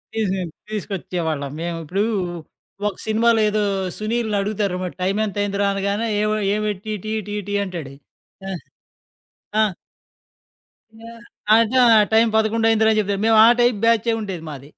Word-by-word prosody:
తీసు 195 -4 0 0.3
తీసుకొచ్చేవాళ్ళం 170 -8 -3
మేము 170 0 -3
ఇప్పుడు 190 +6 -1 0.8
ఒక 205 - -2
సినిమాలో 225 +1 +3
ఏదో 210 0 0 0.3
'సునీల్‌'ని 220 -1 -1
అడుగుతారు 200 -2 -1 0.2
టైం 195 +3 0
ఎంత 205 -1 -6
అయిందిరా 200 0 -1
అనగానే 200 +3 -1
"ఏమొ 215 0 +1 0.2
ఏమిటీటీటీ" 210 0 -3
అంటాడు 165 -8 -7 0.6
ఆహ్, 180 - -5 1.0
ఆ! - - +6 1.4
ఆహ్, 230 0 -12 0.4
అంటే 230 +2 +2 0.2
ఆ - - +7
టైం 225 +1 +5
11:00 220 +1 +2
అయిందిరా 220 0 +3
చెప్తారు. 200 -1 -1
మేము 225 -1 +4
ఆ - - +7
టైప్ 240 -2 +3
బ్యాచే 230 0 +3
ఉండేది 190 -6 -5
మాది. 140 -1 -9
210 Hz, 125 wpm, -21 LUFS, 195-220 Hz, 1.4 s, ఆ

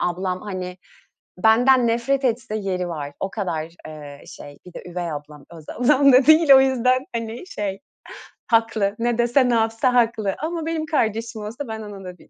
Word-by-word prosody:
ablam, 180 +1 -2
hani, 185 -3 -6 0.6
benden 245 +5 +4
nefret 250 +4 0
etse 235 -2 -1
yeri 185 -3 -3
var. 145 -4 -6
O 195 - -3
kadar, 165 -7 -3 0.2
eee, 145 -2 -10
şey, 145 0 -12
bir 180 - -12
de - - -9
üvey 175 -2 -4
ablam, 150 -1 -9
öz 160 -3 -13
ablam 275 +2 +3
da 255 +2 +5
değil. 315 -1 +5
O 265 - +8
yüzden, 255 0 +1
hani, 230 +7 -5
şey, 200 - -5 0.7
haklı. 225 -3 +1
Ne 240 0 0
dese, 240 +2 +2
ne 240 - +2
yapsa 225 +3 +1
haklı. 225 -5 +1
Ama 325 +1 -4
benim 325 -1 -2
kardeşim 225 -7 -2
olsa 230 +7 -6
ben 220 -1 -6
ona 205 -2 -9
da 180 -1 -9
bir - - -21
225 Hz, 180 wpm, -22 LUFS, 185-255 Hz, 0.7 s, O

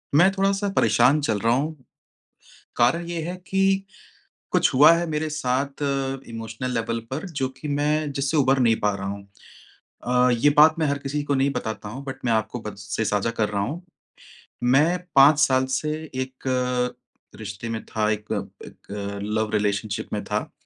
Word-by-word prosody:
मैं 175 +5 +7
थोड़ा-सा 195 +1 0
परेशान 125 +6 +4
चल 110 -7 0
रहा 115 +3 +2
हूँ, 150 +5 -1 1.0
कारण 165 +9 +2
ये 170 -1 -3
है 175 +3 -4
कि 195 0 +2 0.7
कुछ - - +3
हुआ 145 +5 +8
है 170 +1 +1
मेरे 155 0 -1
साथ 140 -1 -2
अ, 135 -1 -1
इमोशनल 115 +2 -5
लेवल 115 0 -1
पर 145 +7 -4
जो 130 - +1
कि 150 - -5
मैं 150 +1 0
जिससे 140 +3 -1
उबर 135 -1 +3
नहीं 115 -3 +3
पा 105 -1 +1
रहा 100 0 -5
हूँ। 100 0 -5 0.8
अ, 125 +1 +3
ये 145 - +5
बात 155 +2 +6
मैं 155 - +1
हर 140 0 0
किसी 140 +1 -3
को 145 - 0
नहीं 135 +1 +2
बताता 110 -4 -4
हूँ 130 +6 -8
बट 135 -1 -8
मैं 120 - +2
आपको 110 +2 -1
बत 105 -2 -7
से 110 +2 -3
साझा 105 +1 0
कर 110 -2 -1
रहा 100 -1 -1
हूँ, 150 - -4 0.8
मैं 145 +8 +4 0.2
5 145 +2 +7
साल 130 -3 +3
से 150 0 -2 0.2
एक 130 0 -5
अ, 125 -1 0 0.4
रिश्ते 105 +1 -6
में 110 -1 -4
था, 105 -1 -1
एक 105 0 -3 0.4
एक 100 0 -7 0.2
लव 110 0 0
रिलेशनशिप 105 0 -1
में - - -2
था। - - -3
130 Hz, 180 wpm, -24 LUFS, 110-150 Hz, 1.0 s, हुआ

